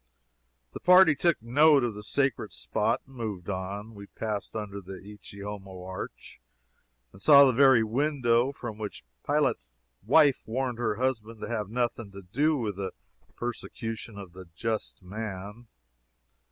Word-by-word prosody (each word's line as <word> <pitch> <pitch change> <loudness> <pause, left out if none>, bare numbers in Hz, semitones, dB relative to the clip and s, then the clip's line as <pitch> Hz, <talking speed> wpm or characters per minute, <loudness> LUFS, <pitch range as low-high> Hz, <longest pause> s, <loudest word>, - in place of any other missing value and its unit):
The - - -6
party 180 -2 +7
took 170 +2 +1
note 145 +3 +5
of 120 -2 -1
the 105 - -8
sacred 135 +4 -1
spot, - - -1
and 135 - -17
moved 105 -6 -4
on. 100 +4 -5
We 100 -1 -11
passed 105 -1 -5
under 100 -2 -5
the 95 +1 -9
"Ecce 105 0 -12
Homo 95 -3 -7
Arch," 95 -8 -8 0.7
and 95 - -15
saw 140 +1 +8
the 130 - +3
very 130 -2 +6
window 125 0 +1
from 120 -6 -7
which 105 - -6 0.2
Pilate's - - 0 0.2
wife 140 +5 +4
warned 125 +1 -2
her 110 -3 0
husband 115 -3 -2
to - - -4
have 105 -4 -2
nothing 120 -2 -2
to 100 0 -10
do 145 - +1
with 105 -6 -3
the 95 -2 -4 0.4
persecution 115 -2 -5
of 95 -4 -9
the 95 0 -10
Just 110 -3 -3
Man. 105 +3 -7
110 Hz, 155 wpm, -28 LUFS, 100-130 Hz, 0.7 s, saw